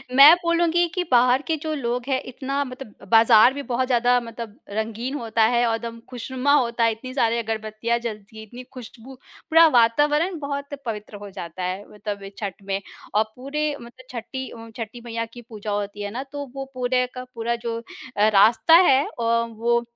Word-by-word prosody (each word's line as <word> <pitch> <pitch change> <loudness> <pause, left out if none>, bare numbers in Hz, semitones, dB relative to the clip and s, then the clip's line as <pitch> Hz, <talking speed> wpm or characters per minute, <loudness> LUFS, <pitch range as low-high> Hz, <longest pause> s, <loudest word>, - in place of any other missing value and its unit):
मैं 280 +4 +10
बोलूँगी 340 0 +2
कि 365 - 0
बाहर 250 +1 +5
के 325 - +1
जो 315 -1 -2
लोग 245 -3 -2
हैं 265 -2 0
इतना 275 +2 -3
मतलब 255 -4 -11
बाज़ार 225 +2 +7
भी 285 - -5
बहुत 255 +2 +1
ज़्यादा 245 0 +3
मतलब 230 -1 -9
रंगीन 220 +5 -3
होता 230 -4 0
है 240 +1 +2
और 225 - +1
एकदम 230 0 -6
खुशनुमा 260 +3 -1
होता 235 -4 +2
है, 230 - +4
इतनी 255 +4 -8
सारे 235 -3 +1
अगरबत्तियाँ 220 +1 -2
जलतीं, 220 -2 -7
इतनी 245 +4 -11
खुशबू, 255 +1 -11 0.3
पूरा 325 +1 +7
वातावरण 295 +7 +3
बहुत 280 0 -5
पवित्र 215 -2 -5
हो 205 0 -9
जाता 180 -1 -7
है 185 +2 -3
मतलब 205 -1 -6
अ, 195 - -7
छठ 200 -1 -5
में। 195 0 -2 0.3
और 210 +1 +4
पूरे 295 +3 -2
मतलब 245 +2 -14
छठी 260 +2 -6
अम, 230 -1 -11
छठी 230 +1 -6
मैया 230 -1 -3
की 245 - -10
पूजा 215 -2 -7
होती 205 0 -3
है 205 0 -4
ना, 250 +5 -4
तो 285 +1 -7
वो 270 0 -4
पूरे 250 0 +1
का 255 - -6
पूरा 235 +1 -1
जो 235 -1 -4 0.4
अ, 210 +1 +5
रास्ता 220 +7 +5
है 270 +1 +5
अ, 235 - -6 0.3
वो 235 +1 +1
235 Hz, 190 wpm, -23 LUFS, 220-265 Hz, 0.4 s, मैं